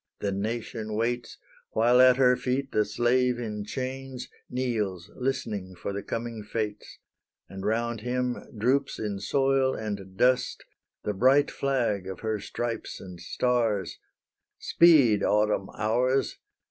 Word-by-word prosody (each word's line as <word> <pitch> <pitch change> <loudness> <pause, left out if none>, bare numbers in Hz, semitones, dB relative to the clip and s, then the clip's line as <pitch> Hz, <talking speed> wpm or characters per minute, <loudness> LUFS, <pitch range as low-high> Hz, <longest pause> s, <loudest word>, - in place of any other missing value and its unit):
the 100 - -1
Nation 110 +1 -3
waits, 120 +2 -2 0.4
While 120 +3 +5
at 130 0 +7
her 125 -1 +5
feet 130 +2 -2
the 105 - +2
slave 120 +3 +2
in 105 -3 -4
chains, 130 +2 -5 0.2
Kneels, 105 -7 -2
listening 105 -8 -3
for 90 +3 -5
the 100 - -3
coming 115 0 -4
fates; 105 0 -4 0.5
And 95 0 -8
round 115 +1 -1
him 125 +1 -1 0.2
droops 130 +5 +1
in 105 -2 -3
soil 135 +2 +2
and 100 -3 -6
dust, 125 +2 +2 0.4
The 105 - -1
bright 130 +7 +4
flag 120 -9 0
of 95 -1 -7
her 110 -1 -1
stripes 120 +3 -4
and 90 -2 -10
stars: 115 -2 0 0.6
Speed, 140 -12 +5
Autumn 105 -2 +1
hours! 125 +5 +1
115 Hz, 130 wpm, -27 LUFS, 105-125 Hz, 0.6 s, at